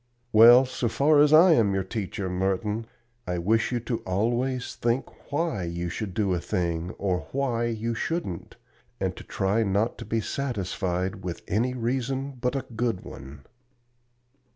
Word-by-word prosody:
"Well, 120 Hz, +4 st, +9 dB
so 125 Hz, -1 st, -2 dB
far 145 Hz, +5 st, +4 dB
as 150 Hz, 0 st, +6 dB
I 165 Hz, +4 st, +8 dB
am 105 Hz, -10 st, +3 dB
your 95 Hz, -, 0 dB
teacher, 95 Hz, -1 st, -4 dB
Merton, 95 Hz, +4 st, -1 dB, 0.4 s
I 90 Hz, 0 st, -1 dB
wish 110 Hz, +8 st, +1 dB
you 120 Hz, -, 0 dB, 0.2 s
always 120 Hz, +7 st, -1 dB
to -, -, -28 dB
think 120 Hz, +4 st, -2 dB
why 145 Hz, -, -1 dB
you 85 Hz, +1 st, -3 dB
should 95 Hz, +1 st, -5 dB
do 100 Hz, -4 st, +1 dB
a 90 Hz, -, 0 dB
thing 85 Hz, 0 st, -2 dB
or 90 Hz, -6 st, -1 dB
why 125 Hz, -4 st, 0 dB
you 115 Hz, 0 st, -2 dB
shouldn't, 120 Hz, -, -4 dB, 0.4 s
and -, -, -1 dB
to -, -, -10 dB
try 100 Hz, +4 st, 0 dB
not 105 Hz, +2 st, 0 dB
to -, -, -7 dB
be 115 Hz, -, -1 dB
satisfied 95 Hz, -6 st, -2 dB
with 90 Hz, -2 st, -5 dB
any 120 Hz, +6 st, 0 dB
reason 130 Hz, +3 st, -2 dB
but 125 Hz, +1 st, 0 dB
a 135 Hz, -1 st, -2 dB
good 115 Hz, -5 st, -1 dB
one." 70 Hz, 0 st, -10 dB
110 Hz, 160 wpm, -26 LUFS, 95-125 Hz, 0.4 s, Well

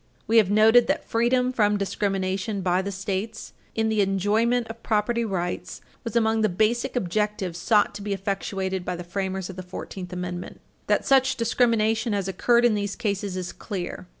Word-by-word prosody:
We 225 Hz, +2 st, +3 dB
have 210 Hz, -4 st, +5 dB
noted 220 Hz, +3 st, +6 dB
that 290 Hz, +3 st, 0 dB
freedom 250 Hz, +2 st, +2 dB
from 210 Hz, -3 st, +2 dB
discrimination 195 Hz, 0 st, -1 dB
by 180 Hz, 0 st, +2 dB
the 200 Hz, +1 st, -4 dB
States 200 Hz, +3 st, -4 dB, 0.2 s
in 225 Hz, 0 st, +1 dB
the 220 Hz, -1 st, +2 dB
enjoyment 210 Hz, +5 st, +2 dB
of 225 Hz, +1 st, -9 dB
property 230 Hz, +2 st, +1 dB
rights 180 Hz, -5 st, -3 dB, 0.2 s
was 230 Hz, -2 st, -5 dB
among 220 Hz, -1 st, +2 dB
the 215 Hz, -, +3 dB
basic 230 Hz, +8 st, 0 dB
objectives 205 Hz, -3 st, -1 dB
sought 210 Hz, +2 st, +3 dB
to 205 Hz, -, -7 dB
be 205 Hz, 0 st, -4 dB
effectuated 195 Hz, -1 st, -2 dB
by 180 Hz, 0 st, -3 dB
the 175 Hz, -, -6 dB
framers 190 Hz, +1 st, -3 dB
of 185 Hz, -, -13 dB
the -, -, -4 dB
Fourteenth 180 Hz, 0 st, -7 dB
Amendment. 180 Hz, 0 st, -5 dB, 0.3 s
That -, -, +2 dB
such 265 Hz, -1 st, +4 dB
discrimination 225 Hz, -1 st, +1 dB
has 200 Hz, -2 st, -1 dB
occurred 235 Hz, +6 st, +3 dB
in 240 Hz, -, +4 dB
these 205 Hz, -1 st, -2 dB
cases 200 Hz, -4 st, -2 dB
is 180 Hz, -1 st, -4 dB
clear. 185 Hz, -3 st, -6 dB
205 Hz, 175 wpm, -25 LUFS, 190-225 Hz, 0.3 s, noted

